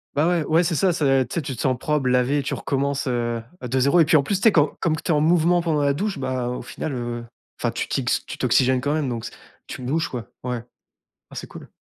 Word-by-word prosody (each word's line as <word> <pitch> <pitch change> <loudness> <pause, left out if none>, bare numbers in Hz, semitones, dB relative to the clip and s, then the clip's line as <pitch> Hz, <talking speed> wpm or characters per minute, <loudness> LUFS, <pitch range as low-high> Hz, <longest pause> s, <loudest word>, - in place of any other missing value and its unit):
Bah 150 +3 +3
ouais. 175 -3 +2
Ouais 165 +4 +3
c'est 165 - 0
ça 180 +3 +2
c'est, 135 -5 +2
tu - - -7
sais, 170 - -1
tu 135 -2 -4
te - - -8
sens 130 -2 +1
propre, 150 -3 0
lavé, 125 +3 +2
tu 140 - -2
recommences, 140 +1 -1
heu, 120 -2 -1 0.2
de 130 +1 -1
0 140 +7 +4
et 160 - +7
puis 155 - +5
en 145 - +4
plus 190 +8 0
tu - - -4
sais 225 - +7
comme 150 -2 +3
comme 160 -1 +1
tu 165 +1 -2
es - - +3
en 150 - +2
mouvement 170 +2 +3
pendant 155 -3 0
la 140 0 +3
douche 195 +2 -2
bah 130 -2 -2
au 125 - -4
final, 155 - -5
heu, 120 -1 -4 0.4
enfin 120 - +1
tu - - -4
t'yx 130 -3 0
tu - - -7
t'oxygènes 125 +1 +3
quand 145 +2 0
même 150 -4 0
donc 120 -1 -4
c'est, - - -8 0.3
tu 130 - -7
bouges, 155 +6 -1
quoi. 120 -6 -6 0.2
Ouais. 125 -2 -3 0.7
Ah, - - -11
c'est - - -6
cool. - - -12
140 Hz, 270 wpm, -23 LUFS, 125-155 Hz, 0.7 s, et